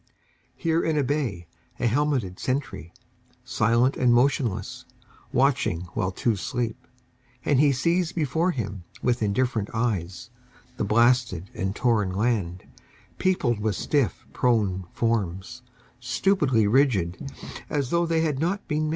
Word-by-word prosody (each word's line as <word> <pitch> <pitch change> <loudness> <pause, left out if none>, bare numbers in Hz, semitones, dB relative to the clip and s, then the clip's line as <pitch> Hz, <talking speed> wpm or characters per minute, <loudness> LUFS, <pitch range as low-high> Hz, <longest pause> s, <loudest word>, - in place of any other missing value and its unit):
Here 165 0 +1
in 160 -2 0
a 145 - +2
bay, 125 - -2 0.3
a - - 0
helmeted 125 -6 0
sentry 130 - -3 0.5
Silent 120 +5 +2
and 125 -1 +3
motionless, 120 -3 +1 0.5
watching 130 - +2
while 95 - 0
two 110 +4 0
sleep, 120 +4 -4 0.6
And 145 -3 +3
he 145 -1 +5
sees 170 +6 +1
before 165 +1 0
him 105 - -4 0.2
With 125 -1 +1
indifferent 110 0 0
eyes 110 0 -2 0.5
the - - -1
blasted 115 -4 +2
and 95 +1 -3
torn 110 -6 +2
land 100 -5 -1 0.6
Peopled 135 - +1
with 105 -2 -1
stiff 130 +2 0
prone 100 -7 +1
forms, 105 -1 -2 0.4
stupidly 130 - +2
rigid, 110 -3 +1 0.4
As 140 -4 -1
tho' 170 0 +2
they 165 -1 +1
had 150 -4 0
not 185 +6 -1
been 150 +1 0
men. - - -1
120 Hz, 130 wpm, -25 LUFS, 105-145 Hz, 0.6 s, he